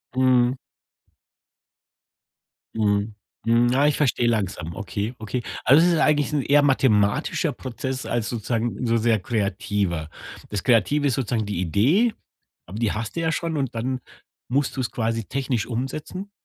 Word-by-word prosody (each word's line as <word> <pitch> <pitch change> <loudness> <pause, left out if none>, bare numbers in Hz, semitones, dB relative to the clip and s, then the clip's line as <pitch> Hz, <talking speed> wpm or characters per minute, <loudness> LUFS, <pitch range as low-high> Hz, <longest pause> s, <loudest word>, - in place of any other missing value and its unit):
Mhm. 130 0 +3 2.2
Mhm, 105 0 0 0.3
hm, 115 +1 +4
ja, 135 +3 +3
ich 150 - +1
verstehe 120 -4 +2
langsam, 95 -7 -1
okay, 105 +2 -4
okay, 110 +3 -3 0.2
also 155 +6 +6
es 175 - +4
ist 160 - +1
eigentlich 150 -1 +2
'n 145 - +2
eher 145 +2 +4
mathematischer 110 -7 +2
Prozess 130 +1 -5
als 115 -2 -1
sozusagen 120 +2 -2
so 115 0 +2
sehr 110 -1 +2
kreativer. 100 -5 -2 0.4
Das 105 -2 -3
Kreative 140 +5 +3
ist 130 - +1
sozusagen 115 -4 -1
die 100 -4 -3
Idee, 140 - +3 0.5
aber 100 +4 -7
die 115 -4 +1
hast 110 +5 -4
du 165 - -1
ja 160 0 +1
schon 165 -2 -2
und 135 -4 -2
dann 125 +3 -2 0.5
musst 135 +2 0
du - - 0
es 120 - -3
quasi 115 -2 -2
technisch 130 -4 -2
umsetzen? 155 - -5
120 Hz, 155 wpm, -23 LUFS, 105-135 Hz, 2.2 s, also